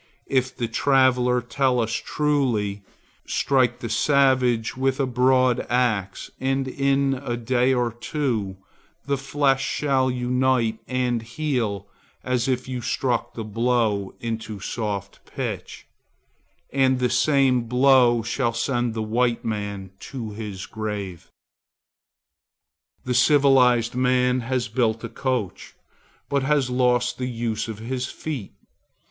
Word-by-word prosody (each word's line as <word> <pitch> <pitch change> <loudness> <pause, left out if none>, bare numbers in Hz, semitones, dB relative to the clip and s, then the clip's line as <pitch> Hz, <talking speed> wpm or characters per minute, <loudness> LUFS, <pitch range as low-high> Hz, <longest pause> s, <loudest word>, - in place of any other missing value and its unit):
If 130 -1 0
the 120 - -1
traveller 125 0 +3
tell 125 +1 +1
us 115 -1 0
truly, 120 -10 0 0.5
strike 130 -4 +1
the 115 - -3
savage 125 -2 +2
with 130 +1 0
a 135 - +2
broad 130 0 +3
axe 110 -6 0
and 135 0 0
in 135 +1 +1
a 120 -2 -2
day 125 +2 +1
or 120 -2 +1
two 115 -5 -3 0.5
the 140 - 0
flesh 135 0 +1
shall 135 -3 +1
unite 125 -2 +1
and 125 -2 0
heal 115 -5 -2 0.4
as 125 -1 0
if 130 -1 -1
you 125 -1 -4
struck 120 +1 -1
the 115 - -4
blow 110 -2 0
into 110 -2 -5
soft 105 -1 -4
pitch, - - -5 0.9
and 130 -1 +3
the 125 0 +1
same 130 -1 +3
blow 125 -2 +4
shall 120 +1 -1
send 120 -1 -1
the 110 - -2
white 120 +2 0 0.6
to 115 -2 -6
his 105 -3 -6
grave. 105 -5 -5 1.7
The 125 - -2
civilized 125 -3 +4
man 125 0 +2
has 125 0 -2
built 115 -1 0
a - - -4
coach, 125 -8 -3 0.5
but 140 -1 0
has 135 -2 +1
lost 125 -1 +1
the 125 - -2
use 115 -2 -2
of 110 -2 -6
his 125 +3 -3
feet. 140 -10 -6
125 Hz, 125 wpm, -23 LUFS, 115-130 Hz, 1.7 s, blow